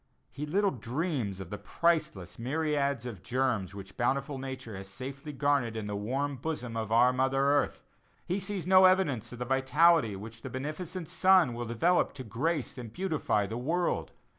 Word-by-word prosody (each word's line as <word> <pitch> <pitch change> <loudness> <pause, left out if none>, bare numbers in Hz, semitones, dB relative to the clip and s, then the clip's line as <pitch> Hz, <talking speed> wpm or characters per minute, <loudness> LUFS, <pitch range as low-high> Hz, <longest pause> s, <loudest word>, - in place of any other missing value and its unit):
He 150 +3 -5
little 195 +5 +2
dreams 125 - -2
of 95 -2 -8
the 105 - -5
priceless 105 - 0
myriads 140 -1 0
of 110 -8 -6
germs 120 -7 -1
which 100 -1 -10
bountiful 135 +3 0
Nature 130 -4 -6
has 95 0 -7
safely 135 +8 -7
garnered 140 -5 +1
in 110 - -3
the 105 0 -3
warm 135 +7 -2
bosom 125 -4 -4
of 110 -1 -3
our 120 +2 +5
mother 130 +1 +1
earth; 140 +1 +2 0.4
he 185 +3 -1
sees 195 -3 -4
no 185 0 +7
evidence 185 - +2
of 125 - -8
that 125 - -3
vitality 135 -2 +4
which 110 +3 -9
the - - -6
beneficent 155 +6 -5
sun 185 -8 +4
will 120 +1 -4
develop 165 +11 +2
to 130 - -7
grace 135 +5 -2
and 115 -3 -7
beautify 155 - 0
the 110 +4 -4
world. 170 +7 -1
130 Hz, 175 wpm, -30 LUFS, 115-155 Hz, 0.4 s, no